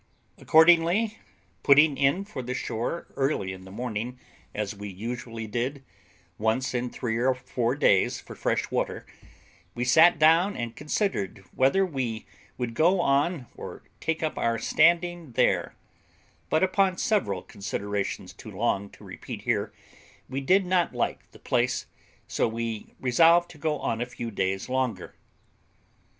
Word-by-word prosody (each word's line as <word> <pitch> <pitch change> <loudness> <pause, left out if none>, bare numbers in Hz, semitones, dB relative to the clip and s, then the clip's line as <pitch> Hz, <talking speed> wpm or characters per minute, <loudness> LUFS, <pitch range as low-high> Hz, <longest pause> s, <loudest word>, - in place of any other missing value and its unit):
Accordingly, 175 +7 +4 0.4
putting 145 +1 +6
in 140 +8 +1
for 200 -10 -6
the 125 +1 -4
shore 120 +11 -3
early 135 -9 0
in 95 0 -11
the 95 - -11
morning, 120 +2 -4 0.3
as 105 0 -3
we 105 0 -7
usually 115 +3 -6
did 125 +6 -3 0.6
once 110 +5 0
in 125 0 -1
three 115 -2 -3
or 130 +2 +2
four 125 -1 -2
days 100 -10 +3
for - - -11
fresh - - -1
water, - - -2 0.7
we 120 +1 -1
sat 160 +7 +6
down 165 +6 +4
and 120 -1 -4
considered 150 - -2
whether 135 +10 +3
we 125 -9 -3 0.3
would 120 -2 -3
go 175 +9 +3
on 145 -1 +1
or - - -9 0.2
take 160 0 -2
up 155 - -2
our 115 0 +1
standing 170 0 +2
there; - - +1 0.7
but 155 - +2
upon 190 0 +2
several 100 - 0
considerations, 100 0 -4
too - - -11
long 100 +1 -1
to - - -17
repeat - - -8
here, - - 0 0.6
we 135 +2 -4
did 185 +7 +3
not 180 -1 +1
like - - -2
the - - -16
place, 125 +1 0 0.4
so - - 0
we 115 -1 -5
resolved 165 +7 +4
to 150 - -15
go 155 0 0
on 115 -4 -2
a 120 - -2
few 120 -1 -6
days 95 -1 -1
longer. 125 -8 -2
130 Hz, 145 wpm, -26 LUFS, 115-165 Hz, 0.7 s, putting